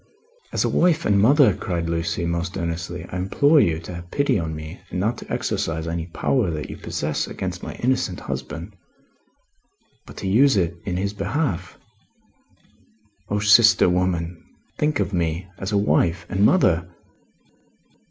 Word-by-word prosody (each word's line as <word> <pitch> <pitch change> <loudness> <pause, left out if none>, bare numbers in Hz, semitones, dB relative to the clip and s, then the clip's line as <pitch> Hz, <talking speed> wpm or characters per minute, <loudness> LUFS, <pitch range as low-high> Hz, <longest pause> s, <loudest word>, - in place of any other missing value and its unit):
"As - - 0
a - - +1
wife 170 -2 +2
and 100 -1 +3
mother," 130 -1 +5
cried 85 -3 -3
Lucie, 85 0 -1
most 85 +2 -2
earnestly, 85 0 -4
"I 90 - -3
implore 140 - +3
you 80 - +2
to 90 - -8
have 85 0 -9
pity 140 -3 +1
on 80 -2 -3
me 80 +3 -8
and 90 - -3
not 110 +5 0
to - - -11
exercise 80 0 -2
any 85 0 -3
power 105 +5 0
that 75 -2 -4
you - - -8
possess, 75 0 -3
against - - -5
my - - -7
innocent 125 -8 -1
husband, 85 +7 -6 1.3
but - - -12
to - - -4
use 120 +5 +4
it 85 -2 0
in 90 -2 -2
his 100 +2 -2
behalf. 125 - -2 1.5
O 105 - 0
sister 105 +2 +6
woman, 90 -2 -1 0.4
think 150 -1 +1
of 100 - -1
me. 85 +1 -1
As 95 +2 -4
a 105 - +2
wife 85 -2 +1
and 95 +2 +1
mother!" 90 - +3
90 Hz, 160 wpm, -23 LUFS, 85-105 Hz, 1.5 s, sister